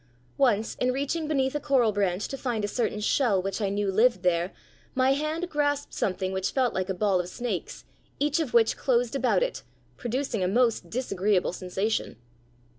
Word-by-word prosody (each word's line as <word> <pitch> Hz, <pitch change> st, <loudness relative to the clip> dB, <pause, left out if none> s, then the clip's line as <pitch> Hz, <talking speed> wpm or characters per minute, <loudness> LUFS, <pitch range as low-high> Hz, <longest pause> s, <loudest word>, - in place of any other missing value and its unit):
Once 225 Hz, -5 st, +2 dB
in 250 Hz, -, +2 dB
reaching 285 Hz, +4 st, -2 dB
beneath 270 Hz, -3 st, +1 dB
a 295 Hz, -, -1 dB
coral 270 Hz, -6 st, +3 dB
branch 200 Hz, -1 st, 0 dB
to -, -, -5 dB
find 240 Hz, -6 st, -2 dB
a -, -, -2 dB
certain 210 Hz, -1 st, -1 dB
shell 215 Hz, -1 st, +2 dB
which 195 Hz, +3 st, -3 dB
I 200 Hz, -, +1 dB
knew 200 Hz, 0 st, 0 dB
lived 220 Hz, -1 st, +3 dB
there, 175 Hz, 0 st, +1 dB, 0.4 s
my 260 Hz, +1 st, +3 dB
hand 305 Hz, +5 st, -2 dB
grasped 290 Hz, -3 st, -1 dB
something 185 Hz, -1 st, -1 dB
which 190 Hz, 0 st, -1 dB
felt 255 Hz, -3 st, +1 dB
like 185 Hz, 0 st, -2 dB
a 190 Hz, -, -1 dB
ball 195 Hz, -1 st, +2 dB
of 180 Hz, 0 st, -3 dB
snakes, 235 Hz, -4 st, -4 dB, 0.3 s
each 295 Hz, +2 st, +1 dB
of 305 Hz, -7 st, -1 dB
which 230 Hz, -2 st, +4 dB
closed 245 Hz, -2 st, +1 dB
about 265 Hz, -, +2 dB
it, -, -, -3 dB, 0.4 s
producing 240 Hz, -4 st, -2 dB
a -, -, +2 dB
most 230 Hz, -3 st, +1 dB
disagreeable 200 Hz, -6 st, 0 dB
sensation. 190 Hz, -, -2 dB
230 Hz, 185 wpm, -27 LUFS, 195-270 Hz, 0.4 s, which